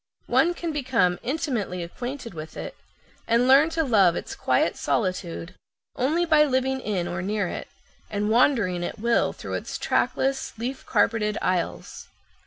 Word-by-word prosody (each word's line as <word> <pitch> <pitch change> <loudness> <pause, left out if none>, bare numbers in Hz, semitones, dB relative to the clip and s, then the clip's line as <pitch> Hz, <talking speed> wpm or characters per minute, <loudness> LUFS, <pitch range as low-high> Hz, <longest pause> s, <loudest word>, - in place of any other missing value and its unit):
One 350 +1 +3
can 340 -2 -3
become 250 - +1
intimately 240 - -2
acquainted 245 +6 -6
with 155 -1 -8
it, - - -6 0.5
and 235 +2 +3
learn 275 +5 +6
to 325 0 0
love 200 - +4
its - - -5
quiet - - +1
solitude, 185 -4 -2 0.4
only 305 +7 +1
by 310 -2 +5
living 265 -1 +1
in 195 -8 -2
or 175 0 -3
near 205 0 -1
it, - - -5 0.4
and 210 +1 -1
wandering 220 -8 +3
at - - -4
will 235 +2 +2
through - - -8
its - - -4
trackless, 270 -3 0
leaf 250 +4 -5
carpeted 210 -1 +1
aisles. 170 - -2
230 Hz, 150 wpm, -25 LUFS, 185-270 Hz, 0.5 s, learn